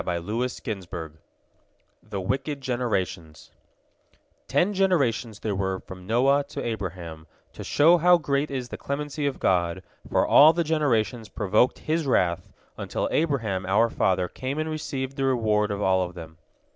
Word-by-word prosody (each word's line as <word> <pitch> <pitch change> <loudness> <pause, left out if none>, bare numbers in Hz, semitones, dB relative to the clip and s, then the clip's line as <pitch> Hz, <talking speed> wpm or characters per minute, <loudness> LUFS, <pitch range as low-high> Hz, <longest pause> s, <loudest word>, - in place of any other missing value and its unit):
V - - -4
ABRAHAM 90 -4 -4 0.8
THE 100 - -6
WICKED 135 +9 -2
GENERATIONS 95 - -3 1.0
Ten 205 +4 +2
generations 135 - +1
there 110 - -2
were 95 -1 -2
from 90 0 -12
Noah 135 +5 +3
to - - -6
Abraham, 85 -8 -5 0.3
to - - -8
show 165 +4 +4
how 180 +2 +6
great 145 -2 -1
is 130 -3 -4
the - - -6
clemency 145 +1 -3
of 140 - -2
God, 90 0 +1 0.3
for - - +2
all 155 +3 +7
the 170 +1 0
generations 125 -8 0
provoked 105 +5 +1
His 155 -1 -2
wrath, 90 -8 +1 0.3
until - - -2
Abraham 115 - 0
our 110 +4 +3
father 95 -1 +1
came 130 - -5
and 155 0 -2
received 135 -3 -4
the 135 - 0
reward 110 -5 +1
of 100 0 -2
all 95 0 +3
of 90 -1 -4
them. 80 -2 -10
115 Hz, 150 wpm, -25 LUFS, 95-140 Hz, 1.0 s, all